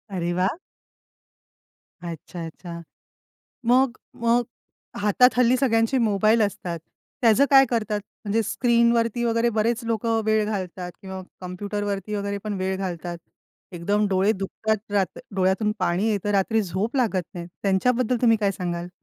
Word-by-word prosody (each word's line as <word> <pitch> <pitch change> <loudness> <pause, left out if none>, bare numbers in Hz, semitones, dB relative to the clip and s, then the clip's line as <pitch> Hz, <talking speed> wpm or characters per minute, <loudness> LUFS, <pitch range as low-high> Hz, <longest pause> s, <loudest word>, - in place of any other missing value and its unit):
अरे 175 0 -1
वाह! 190 - 0 1.5
अच्छा, 170 0 -7
अच्छा. 170 +1 -8 0.9
मग 255 +1 +3 0.2
मग 235 +1 +2 0.6
हातात 210 +5 +5
हल्ली 250 0 +4
सगळ्यांचे 245 0 +2
मोबाईल 215 0 +3
असतात. 190 -4 -2 0.4
त्याचं 235 +4 +5
काय 270 -1 +8
करतात? 215 -3 0 0.2
म्हणजे 220 +2 +1
स्क्रीनवरती 235 0 +2
वगैरे 230 0 +2
बरेच 230 +2 0
लोक 230 -1 -2 0.2
वेळ 215 -1 +2
घालतात 185 -4 -4
किंवा 190 0 -6 0.2
कम्प्युटरवरती 200 +2 -4
वगैरे 200 0 -2
पण 210 -1 -2
वेळ 190 0 -1
घालतात. 175 -2 -4 0.5
एकदम 205 +5 0
डोळे 195 +3 +3
दुखतात 210 +2 -3
रात 195 -4 0 0.2
डोळ्यातून 190 +3 +1
पाणी 185 +4 +1
येतं, 205 0 -1
रात्री 210 +3 +2
झोप 195 - -2
लागत 210 -8 +1
नाही. 170 -1 -6 0.2
त्यांच्याबद्दल 240 +5 +2
तुम्ही 230 -2 +5
काय 200 -1 +2
सांगाल? 175 -1 -4
205 Hz, 130 wpm, -24 LUFS, 185-230 Hz, 1.5 s, काय